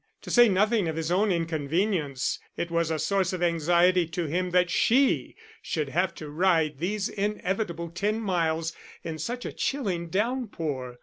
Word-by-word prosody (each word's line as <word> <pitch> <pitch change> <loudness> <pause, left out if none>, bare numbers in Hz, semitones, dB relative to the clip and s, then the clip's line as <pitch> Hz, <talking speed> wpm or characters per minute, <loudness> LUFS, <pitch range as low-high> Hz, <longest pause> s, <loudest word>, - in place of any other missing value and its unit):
To - - -6
say 240 -2 +7
nothing 210 0 +2
of 160 - -2
his 165 +1 -2
own 200 +3 +3
inconvenience, 165 -2 -1 0.2
it 170 - -3
was 170 -1 +1
a 160 - 0
source 185 +4 0
of 180 -1 -2
anxiety 175 +1 +3
to 170 +1 -3
him 180 +4 -1
that 180 0 +2
she 265 +4 +2 0.3
should 155 - -2
have 175 +4 0
to 155 - -8
ride 160 -3 +2
these 195 +4 -1
inevitable 195 -4 -2
ten 205 +6 -1
miles 165 -5 0 0.3
in 160 -1 -5
such 245 +10 -4
a - - -4
chilling 190 -12 -2
downpour. 170 - -2
175 Hz, 165 wpm, -27 LUFS, 160-200 Hz, 0.3 s, say